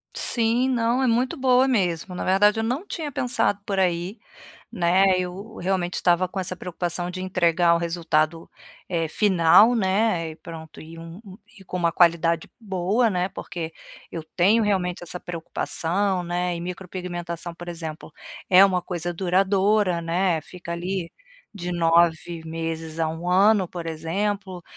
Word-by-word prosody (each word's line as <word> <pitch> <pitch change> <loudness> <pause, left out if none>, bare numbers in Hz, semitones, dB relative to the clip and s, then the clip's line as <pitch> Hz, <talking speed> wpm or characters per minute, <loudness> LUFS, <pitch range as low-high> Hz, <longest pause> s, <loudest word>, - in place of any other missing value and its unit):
Sim. 235 +2 +1
Não, 240 +1 +1
é - - +2
muito 250 +7 +1
boa 260 0 +4
mesmo, 180 -6 0
na - - -3
verdade 205 +3 +4
eu - - 0
não 255 - -2
tinha 320 -7 -5
pensado 240 -5 +1
por 195 - -2
aí, 180 +3 -1 0.5
né, 185 +2 +3
eu 190 +5 -6
realmente 180 -1 -1
estava 180 +1 +2
com 190 - -6
essa 185 -1 -3
preocupação 175 0 -4
de 185 0 -6
entregar 175 -2 +2
o - - +1
resultado, 165 -1 -1 0.4
eh, 165 -3 -1
final, 200 +5 +5
né, 190 -5 +1
e 155 - -14
pronto 160 -2 -10
e 165 +1 -11
um 165 +3 -10 0.4
e 195 - -15
com 180 - -5
uma 170 -2 +1
qualidade 170 -1 +3
boa, 200 +3 +1
né. 180 0 0
Porque, 170 -3 -6 0.4
eu 165 - -4
tenho 205 +6 +4
realmente 185 -4 0
essa 175 +1 -6
preocupação, 180 +2 -2
né, 175 0 -2
e 170 - -5
micropigmentação 175 -1 -5
por 175 +1 -10
exemplo, 160 -2 -7 0.4
é 190 +1 +8
uma 185 -2 +1
coisa 175 -1 -4
duradoura, 190 +1 +2
né, 170 0 +1
fica 175 -1 -8
ali, 175 0 -3 0.4
de 180 -4 -5
9 165 -1 +2
meses 165 0 -5
a 160 - +1
1 165 +2 -5
ano 195 +2 +4
por 175 0 -7
exemplo. 185 +3 -3
180 Hz, 155 wpm, -24 LUFS, 170-195 Hz, 0.5 s, é